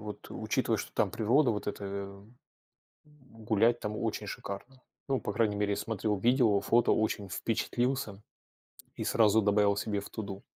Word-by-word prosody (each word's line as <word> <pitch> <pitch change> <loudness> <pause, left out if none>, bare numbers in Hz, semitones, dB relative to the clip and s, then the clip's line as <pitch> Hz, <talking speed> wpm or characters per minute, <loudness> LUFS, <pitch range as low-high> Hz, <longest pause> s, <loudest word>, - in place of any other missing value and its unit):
вот, 105 -1 -8
учитывая, - - 0
что - - -6
там - - +2
природа 120 +5 +3
вот 105 -3 -3
эта, 105 0 -4
э-э, 100 0 -4 1.1
м, 130 -7 -18
гулять 115 +3 +3
там 105 0 -4
очень - - -2
шикарно. 125 +7 -7 0.3
Ну, 135 -2 +1
по - - -3
крайней 105 -1 +1
мере, 105 0 0
я - - -2
смотрел 105 -2 -1
видео, 120 -1 +3
фото, 120 +3 +3
очень 105 -2 0
впечатлился 115 +1 -1 0.7
и - - -4
сразу 110 -1 +4
добавил 100 0 +3
себе 100 0 -1
в 100 - -9
"To 110 - -5
do". 100 0 -7
105 Hz, 170 wpm, -30 LUFS, 100-120 Hz, 1.1 s, сразу